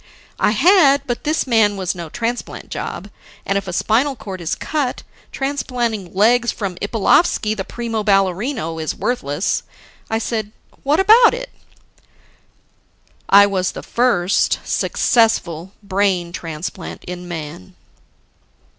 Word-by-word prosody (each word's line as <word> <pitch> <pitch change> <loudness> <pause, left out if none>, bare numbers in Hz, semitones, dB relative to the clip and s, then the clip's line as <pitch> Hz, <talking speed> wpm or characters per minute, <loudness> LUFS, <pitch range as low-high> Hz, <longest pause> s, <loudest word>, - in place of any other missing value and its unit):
I - - +3
had. 280 - +4
But 245 -2 -4
this 310 +2 +1
man 220 -5 +3
was 185 -2 -1
no 170 -3 -7
transplant 235 +6 -4
job. - - -6 0.3
And 195 - -1
if 200 0 -2
a - - -3
spinal 240 +10 +1
cord 190 -6 -8
is 165 - -2
cut, 290 -5 -2 0.3
transplanting 240 -8 -3
legs 240 +4 +3
from 195 -4 -4
Ippalovsky, 215 - +2
the 195 - -3
primo 230 +1 -4
ballerino, 195 - 0
is 155 - -3
worthless. 165 - -1 0.5
I 225 - 0
said, 220 -2 -3 0.3
"What 290 +4 +2
about 450 +5 +6
it?" - - -7 1.8
"I 200 +1 +8
was 190 -2 -1
the - - -8
first 215 -7 +1
successful 190 -7 +1
brain 190 -3 0
transplant 165 +1 -6
in 180 0 -7
man." 150 - -8
210 Hz, 125 wpm, -19 LUFS, 185-245 Hz, 1.8 s, I